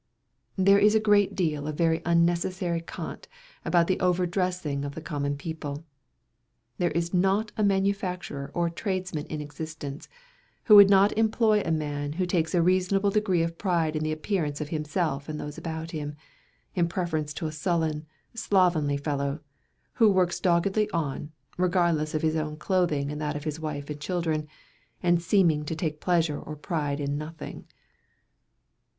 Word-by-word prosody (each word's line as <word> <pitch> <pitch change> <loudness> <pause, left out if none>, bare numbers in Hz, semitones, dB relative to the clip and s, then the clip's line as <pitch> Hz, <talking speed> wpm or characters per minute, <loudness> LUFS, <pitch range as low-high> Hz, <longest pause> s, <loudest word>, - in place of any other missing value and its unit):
There 195 +1 +5
is 210 +1 +5
a - - +5
great 205 -2 +3
deal 155 -5 -1
of 155 -1 -4
very 165 -1 +2
unnecessary 170 +1 +1
cant 165 - -7 0.4
about 175 -1 +3
the 185 +1 0
over 180 0 +2
dressing 180 -6 -1
of 140 0 -5
the 160 - -6
common 145 -2 -2
people. 150 0 -6 0.9
There 175 - +2
is 170 +2 -2
not 195 +4 +2
a 215 - 0
manufacturer 190 -7 -1
or 170 -1 +1
tradesman 185 -4 -3
in 155 -1 -4
existence, 150 -1 -7 0.5
who 215 - +7
would 200 -1 +10
not 200 +1 +5
employ 220 -1 +3
a 165 - -3
man 145 -2 -2
who 180 +3 -1
takes 175 -2 0
a 170 - +4
reasonable 185 +3 +2
degree 195 -5 +2
of 165 0 -4
pride 170 -5 0
in 155 - -1
the 155 0 -1
appearance 155 -2 -2
of 150 -1 -4
himself 155 -2 -2
and 150 0 -4
those 150 0 -6
about 160 0 -5
him, 150 -2 -5 0.6
in 175 -2 +1
preference 165 -4 -2
to - - -4
a 155 - -2
sullen, 155 -1 -1 0.3
slovenly 175 -10 +2
fellow, 140 0 -2 0.5
who 225 -3 +5
works 185 -3 +2
doggedly 190 +4 +2
on, 150 -2 -3 0.3
regardless 170 -4 +1
of 155 - -1
his 160 0 +2
own 155 -1 -2
clothing 155 -5 0
and 150 +1 -5
that 150 -1 -2
of 145 - -5
his 155 0 -4
wife 150 -2 -4
and 150 -1 -6
children, 160 -3 -1 0.6
and 175 -1 +3
seeming 170 -4 +3
to 155 +2 -4
take 155 -1 -3
pleasure 165 -4 +1
or 155 - -7
pride 150 -2 -2
in 145 0 -2
nothing. 155 +1 -8
165 Hz, 165 wpm, -27 LUFS, 150-185 Hz, 0.9 s, would